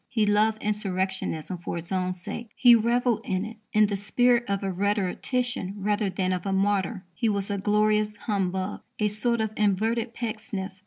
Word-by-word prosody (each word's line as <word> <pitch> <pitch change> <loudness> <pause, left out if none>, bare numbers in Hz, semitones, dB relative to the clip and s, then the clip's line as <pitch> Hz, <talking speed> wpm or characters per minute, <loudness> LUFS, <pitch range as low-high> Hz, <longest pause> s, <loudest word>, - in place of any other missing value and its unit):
He 220 -3 +2
loved 210 +1 +2
insurrectionism 190 -4 -2
for 170 - -4
its 170 +2 -7
own 185 -1 0
sake. 205 +5 -7
He 245 -2 +7
revelled 235 0 +2
in 190 -2 -1
it 225 +1 -8
in 215 0 +5
the 205 -1 -1
spirit 240 +4 +2
of 200 0 -1
a 195 - -1
rhetorician 205 +3 -1
rather 205 +1 0
than 185 0 -1
of 180 -2 -3
a 195 - -2
martyr. 195 0 0
He 225 +6 0
was 200 -1 -1
a 200 - -1
glorious 210 +1 +2
humbug, 190 -3 -2 0.2
a 210 - +2
sort 220 +3 0
of 220 -1 -1
inverted 220 +3 +1
Pecksniff. 215 -4 -4
205 Hz, 175 wpm, -26 LUFS, 190-220 Hz, 0.2 s, He